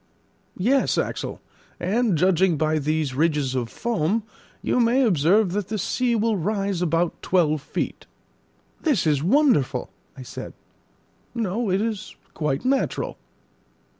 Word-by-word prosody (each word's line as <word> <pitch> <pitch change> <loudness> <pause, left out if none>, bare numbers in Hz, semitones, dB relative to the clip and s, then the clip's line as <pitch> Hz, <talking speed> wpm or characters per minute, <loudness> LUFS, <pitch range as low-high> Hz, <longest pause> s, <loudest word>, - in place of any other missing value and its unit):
"Yes, 260 +8 +2
Axel; - - -3 0.4
and 210 0 +1
judging 180 0 +3
by 155 +1 +1
these 150 -1 -1
ridges 150 -2 +1
of 125 -3 -2
foam, 220 - -1 0.4
you - - +1
may 245 +3 +3
observe 190 - +3
that 200 0 -2
the 215 - -3
sea 240 +5 0
will 220 -1 +1
rise 195 0 -1
about 170 0 0
twelve 155 -5 +2
feet." - - -4 0.7
"This 285 - +1
is 150 -3 +2
wonderful," 170 - +2 0.3
I 130 - -8
said. - - -8 0.8
"No; 225 0 -1
it 190 +2 +1
is 220 -4 -4 0.2
quite 150 - -2
natural." 270 +1 0
185 Hz, 130 wpm, -24 LUFS, 155-225 Hz, 0.8 s, judging